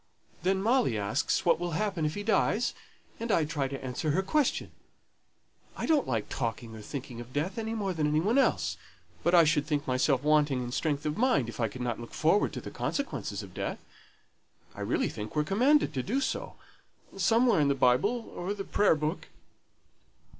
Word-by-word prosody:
Then 190 Hz, +1 st, +1 dB
Molly 235 Hz, -, +2 dB
asks 105 Hz, +7 st, 0 dB
what 170 Hz, -, +4 dB
will 175 Hz, -1 st, -3 dB
happen 195 Hz, -6 st, -1 dB
if 150 Hz, -, -4 dB
he 205 Hz, -, -4 dB
dies; 225 Hz, +1 st, +1 dB, 0.5 s
and 230 Hz, 0 st, -2 dB
I 165 Hz, -5 st, +3 dB
try 145 Hz, -3 st, -1 dB
to 135 Hz, 0 st, -6 dB
answer 130 Hz, +5 st, -2 dB
her 185 Hz, +6 st, +1 dB
question. 285 Hz, +7 st, 0 dB, 1.1 s
I -, -, -2 dB
don't 310 Hz, -3 st, +2 dB
like 115 Hz, -4 st, -1 dB
talking 115 Hz, -2 st, -4 dB
or 110 Hz, -, -9 dB
thinking 125 Hz, 0 st, -7 dB
of 120 Hz, +2 st, -12 dB
death 180 Hz, +9 st, -2 dB
any 225 Hz, 0 st, -3 dB
more 200 Hz, -4 st, -1 dB
than 155 Hz, -3 st, 0 dB
any 150 Hz, +1 st, +2 dB
one 220 Hz, +11 st, +2 dB
else; 85 Hz, -, +1 dB, 0.5 s
but 175 Hz, +2 st, +4 dB
I 170 Hz, -, +8 dB
should 150 Hz, -2 st, +2 dB
think 145 Hz, -2 st, -1 dB
myself 130 Hz, +1 st, +1 dB
wanting 150 Hz, -4 st, +3 dB
in 120 Hz, -, -5 dB
strength 145 Hz, +2 st, -1 dB
of 150 Hz, +4 st, -2 dB
mind 145 Hz, -, +2 dB
if 120 Hz, -, -9 dB
I 115 Hz, -, +2 dB
could 125 Hz, +4 st, -8 dB
not 120 Hz, -2 st, -2 dB
look 120 Hz, -, -9 dB
forward 165 Hz, +6 st, +3 dB
to -, -, -5 dB
the -, -, -8 dB
consequences 125 Hz, -, -3 dB
of 95 Hz, -2 st, -12 dB
death. -, -, -3 dB, 1.0 s
I -, -, -9 dB
really -, -, 0 dB
think 105 Hz, +5 st, -7 dB
we're 150 Hz, -, +2 dB
commanded 255 Hz, -, +3 dB
to 130 Hz, -, -1 dB
do 230 Hz, -, -1 dB
so, -, -, -3 dB, 0.6 s
somewhere 225 Hz, +1 st, +3 dB
in 145 Hz, -, +3 dB
the 140 Hz, -, +2 dB
Bible 170 Hz, -, +1 dB
or 185 Hz, +4 st, -3 dB
the 200 Hz, -, -4 dB
Prayer 205 Hz, -3 st, +3 dB
book." 155 Hz, +3 st, -3 dB
155 Hz, 195 wpm, -29 LUFS, 130-205 Hz, 1.1 s, I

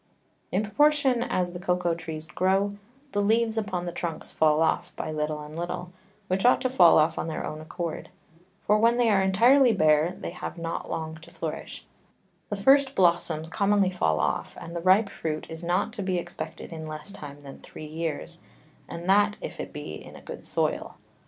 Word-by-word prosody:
In 190 Hz, +5 st, +1 dB
proportion 275 Hz, +2 st, +3 dB
as 180 Hz, -8 st, -1 dB
the 175 Hz, -, -6 dB
Cocao 180 Hz, -1 st, 0 dB
Trees 160 Hz, -2 st, -6 dB
grow, 195 Hz, +4 st, +1 dB, 0.4 s
the 205 Hz, -, 0 dB
Leaves 225 Hz, +2 st, +2 dB
upon 200 Hz, -5 st, -2 dB
the 175 Hz, -, -3 dB
Trunks 165 Hz, -2 st, -5 dB
fall 155 Hz, 0 st, +3 dB
off 175 Hz, +2 st, 0 dB
by 155 Hz, -, -4 dB
little 150 Hz, 0 st, -2 dB
and 150 Hz, +1 st, -9 dB
little, 175 Hz, +1 st, -4 dB, 0.4 s
which 190 Hz, +1 st, 0 dB
ought 245 Hz, -, +5 dB
to 255 Hz, -, 0 dB
fall 175 Hz, -10 st, +7 dB
off 155 Hz, +1 st, +3 dB
on -, -, -2 dB
their 160 Hz, -, -3 dB
own 155 Hz, 0 st, -6 dB
accord; 170 Hz, +1 st, -5 dB, 0.6 s
for 210 Hz, +1 st, +4 dB
when 230 Hz, +2 st, +4 dB
they 240 Hz, -2 st, +3 dB
are 195 Hz, -2 st, +4 dB
entirely 235 Hz, +7 st, +5 dB
bare, 155 Hz, -2 st, +3 dB
they -, -, -5 dB
have 180 Hz, -, -6 dB
not 165 Hz, 0 st, -4 dB
long 160 Hz, 0 st, -4 dB
to 160 Hz, -, -14 dB
flourish: -, -, -6 dB, 0.6 s
The 205 Hz, -, -1 dB
first 270 Hz, +6 st, +4 dB
Blossoms 170 Hz, -3 st, +2 dB
commonly 200 Hz, +1 st, +2 dB
fall 80 Hz, -, +1 dB
off, -, -, -1 dB
and 170 Hz, -, -8 dB
the 170 Hz, -, -2 dB
ripe 190 Hz, +4 st, +5 dB
Fruit 155 Hz, -4 st, -4 dB
is 160 Hz, +1 st, -7 dB
not 180 Hz, +5 st, 0 dB
to 220 Hz, -, -5 dB
be 185 Hz, -2 st, 0 dB
expected 175 Hz, 0 st, -6 dB
in 160 Hz, -1 st, -6 dB
less 155 Hz, +5 st, -6 dB
time 145 Hz, -6 st, -10 dB
than 135 Hz, -1 st, -10 dB
three 155 Hz, -, -10 dB
Years, 160 Hz, +1 st, -4 dB, 0.5 s
and 170 Hz, +1 st, -6 dB
that 205 Hz, +2 st, +4 dB
if -, -, -7 dB
it -, -, -5 dB
be -, -, -7 dB
in -, -, -12 dB
a -, -, -11 dB
good -, -, -8 dB
Soil. -, -, -1 dB
180 Hz, 195 wpm, -27 LUFS, 160-205 Hz, 0.6 s, fall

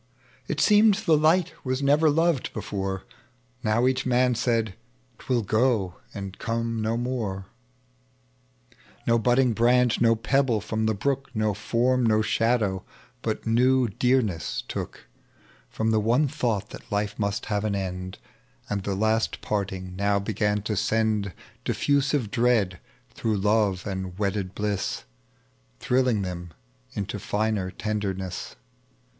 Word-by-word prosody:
It -, -, -2 dB
seemed 210 Hz, -1 st, +6 dB
Ibe 215 Hz, -, -7 dB
light 170 Hz, +2 st, +3 dB
waa 130 Hz, -1 st, 0 dB
never 145 Hz, +3 st, +4 dB
loved 165 Hz, -2 st, +1 dB
before, 95 Hz, -1 st, -3 dB, 0.6 s
Now 110 Hz, +1 st, +2 dB
eacli 130 Hz, +1 st, +1 dB
man 125 Hz, 0 st, +3 dB
said, 115 Hz, -3 st, 0 dB, 0.5 s
"'Twill 125 Hz, -4 st, 0 dB
go 110 Hz, -4 st, +1 dB
and 100 Hz, -1 st, -7 dB
come 115 Hz, -1 st, -2 dB
no 115 Hz, -4 st, -2 dB, 1.6 s
No 115 Hz, 0 st, +3 dB
budding 120 Hz, +1 st, +3 dB
branch, 120 Hz, +1 st, +3 dB
no 115 Hz, -1 st, +5 dB
pebble 125 Hz, 0 st, +1 dB
from 110 Hz, +1 st, -2 dB
the 110 Hz, -, +1 dB
brook, 135 Hz, +6 st, -1 dB
No 110 Hz, -1 st, +1 dB
form, 120 Hz, +5 st, +1 dB
no 110 Hz, -1 st, +3 dB
shadow, 110 Hz, -4 st, +1 dB, 0.4 s
but -, -, -3 dB
new 125 Hz, +2 st, +3 dB
deamess 110 Hz, -6 st, 0 dB
took -, -, -6 dB, 0.6 s
From 110 Hz, 0 st, -1 dB
the 110 Hz, -, +3 dB
one 120 Hz, +8 st, +3 dB
thought 110 Hz, -6 st, -2 dB
that -, -, -11 dB
life 105 Hz, +1 st, -1 dB
mnst 100 Hz, 0 st, -1 dB
have 105 Hz, -1 st, -1 dB
an 105 Hz, -2 st, 0 dB
end; 95 Hz, -1 st, -4 dB, 0.5 s
And 100 Hz, -1 st, 0 dB
the 100 Hz, 0 st, -2 dB
laat 110 Hz, +2 st, +1 dB
parting 95 Hz, -3 st, -3 dB
now 100 Hz, +1 st, +1 dB
began 105 Hz, 0 st, 0 dB
to 105 Hz, +1 st, -1 dB
send 105 Hz, -1 st, +1 dB, 0.3 s
Diffusive 140 Hz, -5 st, +1 dB
dread 115 Hz, -7 st, +2 dB, 0.3 s
through 110 Hz, -3 st, -1 dB
love 105 Hz, -2 st, +1 dB
and 95 Hz, -3 st, -4 dB
wedded 100 Hz, -2 st, -2 dB
bliss, 105 Hz, -2 st, -2 dB, 0.8 s
Thrilling 125 Hz, -5 st, +2 dB
them 90 Hz, -2 st, -6 dB, 0.4 s
into 100 Hz, 0 st, -3 dB
finer 105 Hz, -2 st, -1 dB
tenderness. 95 Hz, -3 st, -4 dB
110 Hz, 130 wpm, -26 LUFS, 100-125 Hz, 1.6 s, seemed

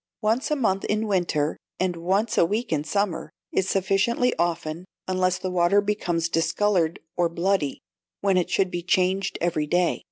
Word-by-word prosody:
Once 225 Hz, +5 st, +1 dB
a 300 Hz, -, +2 dB
month 195 Hz, -8 st, 0 dB
in 215 Hz, +1 st, 0 dB
winter, 175 Hz, -7 st, 0 dB, 0.2 s
and 185 Hz, -1 st, 0 dB
once 190 Hz, +6 st, 0 dB
a -, -, +5 dB
week 210 Hz, +3 st, -1 dB
in 150 Hz, -1 st, 0 dB
summer, 180 Hz, -2 st, -1 dB, 0.2 s
is 190 Hz, 0 st, 0 dB
sufficiently 195 Hz, +6 st, +1 dB
often, 170 Hz, -1 st, -1 dB, 0.2 s
unless 185 Hz, -1 st, +1 dB
the 185 Hz, -, -4 dB
water 180 Hz, +2 st, +3 dB
becomes 180 Hz, -5 st, 0 dB
discoloured 170 Hz, 0 st, +1 dB, 0.2 s
or 175 Hz, -1 st, +2 dB
bloody, 170 Hz, -4 st, -1 dB, 0.4 s
when 195 Hz, -1 st, +2 dB
it 180 Hz, -1 st, +1 dB
should 190 Hz, 0 st, +1 dB
be 175 Hz, -, -3 dB
changed 185 Hz, +2 st, +1 dB
every 160 Hz, -3 st, 0 dB
day. 175 Hz, +2 st, +1 dB
185 Hz, 165 wpm, -25 LUFS, 170-200 Hz, 0.4 s, a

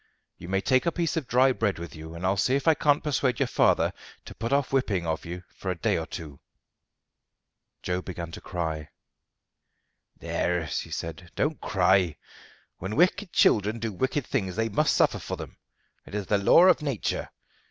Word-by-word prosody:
"You 85 Hz, -, -9 dB
may 95 Hz, 0 st, +1 dB
take 130 Hz, -, +2 dB
a -, -, +3 dB
piece 170 Hz, -1 st, -1 dB
of 155 Hz, -6 st, -2 dB
dry 130 Hz, +2 st, +4 dB
bread 110 Hz, -6 st, 0 dB
with 85 Hz, 0 st, -8 dB
you, 80 Hz, +1 st, -9 dB
and 85 Hz, +2 st, -5 dB
I'll 95 Hz, +2 st, +2 dB
see 125 Hz, +7 st, +2 dB
if 140 Hz, +2 st, -2 dB
I 160 Hz, -, +7 dB
can't 145 Hz, -1 st, +2 dB
persuade 135 Hz, -4 st, 0 dB
your -, -, +3 dB
father -, -, +2 dB, 0.3 s
to -, -, -9 dB
put 115 Hz, +4 st, -4 dB
off 140 Hz, -1 st, +1 dB
whipping 105 Hz, -10 st, +1 dB
of 80 Hz, -1 st, -2 dB
you 90 Hz, +1 st, -6 dB
for 95 Hz, -, -5 dB
a 90 Hz, -, 0 dB
day -, -, +1 dB
or 80 Hz, -, -3 dB
two." 75 Hz, -6 st, -8 dB, 1.4 s
Joe 90 Hz, 0 st, -1 dB
began 85 Hz, -3 st, -6 dB
to -, -, -9 dB
cry. 80 Hz, -4 st, -4 dB, 1.3 s
"There," 90 Hz, -2 st, -1 dB
she -, -, -3 dB
said, 85 Hz, +2 st, -6 dB
"don't 150 Hz, +1 st, -1 dB
cry. 95 Hz, -4 st, +2 dB, 0.6 s
When 95 Hz, +4 st, -4 dB
wicked 180 Hz, +3 st, +2 dB
children 105 Hz, +1 st, +3 dB
do 115 Hz, -2 st, -3 dB
wicked 130 Hz, +7 st, -1 dB
things 95 Hz, -3 st, -2 dB
they 115 Hz, +1 st, 0 dB
must 150 Hz, +9 st, +2 dB
suffer -, -, +3 dB
for -, -, -5 dB
them. -, -, -9 dB, 0.5 s
It -, -, -8 dB
is 105 Hz, -2 st, -2 dB
the 100 Hz, +2 st, +2 dB
law 130 Hz, -, +6 dB
of 180 Hz, -3 st, +5 dB
nature. 140 Hz, -8 st, -2 dB
100 Hz, 190 wpm, -27 LUFS, 90-135 Hz, 1.4 s, I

